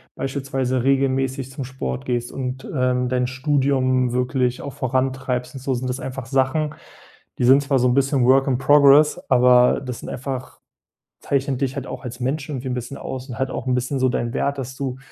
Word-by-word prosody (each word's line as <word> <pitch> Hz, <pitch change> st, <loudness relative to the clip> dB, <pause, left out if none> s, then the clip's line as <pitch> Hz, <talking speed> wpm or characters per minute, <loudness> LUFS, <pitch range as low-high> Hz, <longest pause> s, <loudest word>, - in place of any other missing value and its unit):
beispielsweise 135 Hz, -2 st, -2 dB
regelmäßig 135 Hz, 0 st, +1 dB
zum 135 Hz, +1 st, -5 dB
Sport 65 Hz, -, -5 dB
gehst 120 Hz, -1 st, -2 dB
und, 130 Hz, 0 st, -5 dB
ähm, 125 Hz, -1 st, +1 dB
dein 125 Hz, 0 st, 0 dB
Studium 130 Hz, -1 st, +1 dB
wirklich 125 Hz, 0 st, 0 dB
auch 140 Hz, -, -6 dB
vorantreibst 130 Hz, 0 st, -2 dB
und 130 Hz, -, -7 dB
so, 135 Hz, -1 st, -1 dB
sind 125 Hz, +1 st, -3 dB
das 125 Hz, +2 st, -3 dB
einfach 135 Hz, -1 st, -6 dB
Sachen, 135 Hz, +4 st, 0 dB, 0.6 s
die -, -, +1 dB
sind 135 Hz, +3 st, +6 dB
zwar 135 Hz, -2 st, +1 dB
so 125 Hz, -, +3 dB
'n 125 Hz, -, +2 dB
bisschen 135 Hz, -1 st, +2 dB
work 135 Hz, +2 st, +4 dB
in 130 Hz, -2 st, +2 dB
progress, 145 Hz, +2 st, +6 dB
aber 125 Hz, -1 st, +5 dB
das 125 Hz, -3 st, -6 dB
sind -, -, -7 dB
einfach 130 Hz, 0 st, -6 dB, 0.6 s
zeichnet 135 Hz, -1 st, -1 dB
dich 135 Hz, 0 st, -1 dB
halt 135 Hz, -2 st, -5 dB
auch -, -, -7 dB
als 125 Hz, -1 st, -7 dB
Mensch 140 Hz, +4 st, -2 dB
irgendwie 130 Hz, -2 st, -4 dB
'n 125 Hz, -, -1 dB
bisschen 125 Hz, +3 st, -6 dB
aus 130 Hz, +1 st, -6 dB
und 120 Hz, -, -7 dB
halt 130 Hz, 0 st, 0 dB
auch -, -, -5 dB
'n 125 Hz, -, +2 dB
bisschen 125 Hz, +3 st, -1 dB
so 130 Hz, -, +3 dB
deinen 120 Hz, -1 st, -2 dB
Wert, 140 Hz, 0 st, -1 dB
dass 130 Hz, 0 st, -6 dB
du 130 Hz, -2 st, -4 dB
130 Hz, 200 wpm, -22 LUFS, 125-135 Hz, 0.6 s, sind